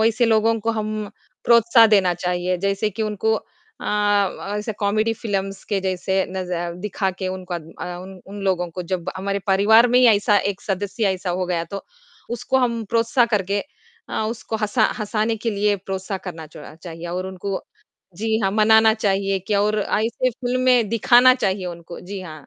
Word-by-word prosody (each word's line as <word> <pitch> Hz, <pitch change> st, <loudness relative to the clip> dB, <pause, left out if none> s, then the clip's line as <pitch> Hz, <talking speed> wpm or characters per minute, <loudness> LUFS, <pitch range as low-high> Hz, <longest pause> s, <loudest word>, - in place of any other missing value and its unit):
वैसे 230 Hz, +2 st, +3 dB
लोगों 225 Hz, 0 st, +3 dB
को 230 Hz, -, 0 dB
हम 215 Hz, -1 st, -3 dB, 0.3 s
प्रोत्साह 235 Hz, 0 st, +6 dB
देना 195 Hz, -5 st, +3 dB
चाहिए, 180 Hz, +1 st, -1 dB
जैसे 200 Hz, +3 st, 0 dB
कि 220 Hz, +3 st, -4 dB
उनको 215 Hz, +1 st, 0 dB, 0.4 s
अ, 205 Hz, -1 st, 0 dB
ऐसे 210 Hz, +1 st, -4 dB
कॉमेडी 215 Hz, +2 st, +1 dB
फिल्म्स 195 Hz, -3 st, -3 dB
के 200 Hz, -2 st, -1 dB
जैसे 190 Hz, 0 st, -2 dB, 0.2 s
नज़ 185 Hz, -1 st, -5 dB, 0.3 s
दिखा 195 Hz, -1 st, -1 dB
के 190 Hz, -, -3 dB
उनका 185 Hz, -1 st, -5 dB
अ, 170 Hz, +2 st, -8 dB
उन 190 Hz, 0 st, -11 dB
उन 200 Hz, +1 st, -8 dB
लोगों 180 Hz, -2 st, +1 dB
को 180 Hz, -, -4 dB
जब 180 Hz, +1 st, -3 dB
हमारे 200 Hz, +1 st, -2 dB
परिवार 210 Hz, +5 st, +5 dB
में 245 Hz, +1 st, +4 dB
ही 250 Hz, -, +6 dB
ऐसा 205 Hz, 0 st, +2 dB
एक 195 Hz, -, -8 dB
सदस्य 205 Hz, +3 st, -2 dB
ऐसा 185 Hz, 0 st, -4 dB
हो 185 Hz, +1 st, -1 dB
गया, 170 Hz, -2 st, -1 dB
तो 200 Hz, +4 st, -7 dB, 0.5 s
उसको 240 Hz, +3 st, 0 dB
हम 235 Hz, -3 st, 0 dB
प्रोत्साह 235 Hz, +2 st, +3 dB
करके 200 Hz, 0 st, 0 dB, 0.5 s
अ, -, -, -2 dB
उसको 225 Hz, -1 st, -5 dB
हँसा 215 Hz, +2 st, +2 dB
हँसाने 215 Hz, +1 st, -1 dB
के 225 Hz, +1 st, -2 dB
लिए 205 Hz, 0 st, +1 dB
प्रोत्साह 190 Hz, 0 st, -4 dB
करना 165 Hz, -3 st, -7 dB
चोड़ा 150 Hz, 0 st, -12 dB
चाहिए 165 Hz, +1 st, -9 dB
और 180 Hz, +2 st, -3 dB
उनको 190 Hz, +1 st, -4 dB, 0.5 s
जी, 220 Hz, +2 st, 0 dB
हाँ, 195 Hz, -, +1 dB
मनाना 220 Hz, +1 st, +5 dB
चाहिए 195 Hz, -1 st, -1 dB
और 210 Hz, +1 st, +1 dB
ऐसी 225 Hz, +5 st, 0 dB
फ़िल्में 250 Hz, -1 st, +1 dB
दिखाना 240 Hz, +3 st, +5 dB
चाहिए 195 Hz, -6 st, -1 dB
उनको। 170 Hz, -1 st, -8 dB
जी, 190 Hz, +1 st, -7 dB
हाँ। 155 Hz, -5 st, -10 dB
205 Hz, 175 wpm, -22 LUFS, 185-220 Hz, 0.5 s, प्रोत्साह